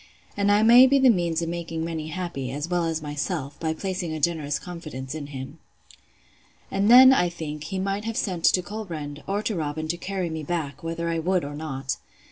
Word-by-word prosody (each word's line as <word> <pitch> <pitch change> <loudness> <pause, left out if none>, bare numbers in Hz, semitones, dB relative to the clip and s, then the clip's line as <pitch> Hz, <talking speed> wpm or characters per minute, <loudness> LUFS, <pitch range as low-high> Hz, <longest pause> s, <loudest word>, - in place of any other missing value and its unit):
And 200 0 +2
I 205 +1 +4
may 240 +3 +8
be 275 +1 +4
the 265 -2 +6
means 170 -4 0
of 165 - -3
making 165 -1 -4
many 160 -2 -4
happy, 160 -6 -4
as 145 +4 -4
well 175 -1 0
as 160 -1 -2
myself, 145 0 -4
by 160 -1 -1
placing 185 -2 -3
a 155 - -4
generous 150 -2 0
confidence 150 -6 -7
in 155 -2 -6
him. 140 +2 -8 1.1
And 195 +2 +1
then, 260 +2 +10
I 180 -8 +3
think, 150 -3 -6
he 190 +4 -4
might 195 +2 -2
have 225 0 -3
sent 180 -4 -1
to 180 - +4
Colbrand, 165 -8 -6
or 205 +2 -1
to 215 - -1
Robin, 155 -1 -3
to 170 - -1
carry 185 -2 -3
me 160 0 -4
back, 150 -3 -3
whether 165 0 -3
I 165 0 0
would 180 0 0
or 145 - -6
not. 135 -3 -4
165 Hz, 210 wpm, -25 LUFS, 150-190 Hz, 1.1 s, then